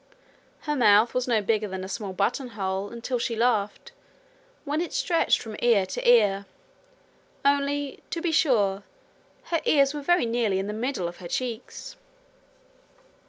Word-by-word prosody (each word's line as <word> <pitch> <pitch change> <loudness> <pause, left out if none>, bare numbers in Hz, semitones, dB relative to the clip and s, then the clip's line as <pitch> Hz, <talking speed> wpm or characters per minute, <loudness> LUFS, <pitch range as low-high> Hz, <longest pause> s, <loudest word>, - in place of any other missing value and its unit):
Her 295 -1 -2
mouth 220 -3 +4
was 250 0 -1
no 225 -4 +1
bigger 215 0 0
than 190 -1 -6
a - - -5
small 195 +1 -5
buttonhole 200 -1 -2
until 235 +1 -4
she 235 -1 -2
laughed, 225 - 0 0.7
when 300 +2 -1
it 345 - -4
stretched 335 -2 +2
from 220 -2 -8
ear 230 -5 +3
to 190 - -1
ear 200 -4 +4 1.0
only, 280 0 0
to 335 - -3
be 330 0 -1
sure, 210 -11 +2 0.7
her 335 - +1
ears 280 -1 +3
were 295 - -5
very 350 -1 +2
nearly 230 -4 0
in 190 - -2
the 210 - -4
middle 225 -5 -2
of 175 - -8
her 180 - -8
cheeks. 240 +4 -5
235 Hz, 155 wpm, -26 LUFS, 200-280 Hz, 1.0 s, mouth